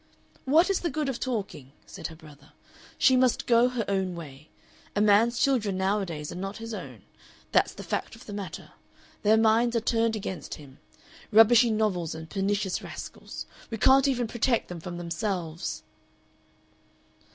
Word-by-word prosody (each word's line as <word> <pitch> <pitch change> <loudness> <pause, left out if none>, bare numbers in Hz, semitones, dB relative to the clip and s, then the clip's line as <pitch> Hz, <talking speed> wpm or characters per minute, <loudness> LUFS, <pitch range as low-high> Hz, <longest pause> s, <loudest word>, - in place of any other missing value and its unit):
"What 325 +8 +4
is 390 - +1
the 345 - -2
good 300 -1 -2
of 255 - -3
talking?" 200 - -4
said - - -7
her 160 - -11
brother. 150 -2 -17 0.4
"She 260 - +5
must 255 -1 +2
go 235 +1 +4
her 245 -4 -2
own 190 -2 -1
way. 150 -2 -10 0.5
A - - +1
man's 215 +3 +4
children 220 -9 +1
nowadays 190 -6 -1
are - - -7
not 195 +1 -5
his 225 0 -7
own. - - -8 0.5
That's - - +3
the - - -8
fact - - -3
of 225 - -15
the 205 - -8
matter. 195 -5 -7 0.5
Their 215 +1 +4
minds 225 +2 +3
are - - +4
turned 225 0 +1
against 190 -7 -5
him.... 140 -2 -14 0.5
Rubbishy 225 +2 +7
novels 205 -7 0
and 160 0 -8
pernicious 195 -1 -1
rascals. - - -8 0.2
We 225 - -4
can't 265 +5 +5
even 250 -3 +1
protect 235 +1 0
them 175 -1 -6
from 175 +1 -7
themselves." 170 -1 -3
210 Hz, 165 wpm, -27 LUFS, 175-235 Hz, 0.5 s, Rubbishy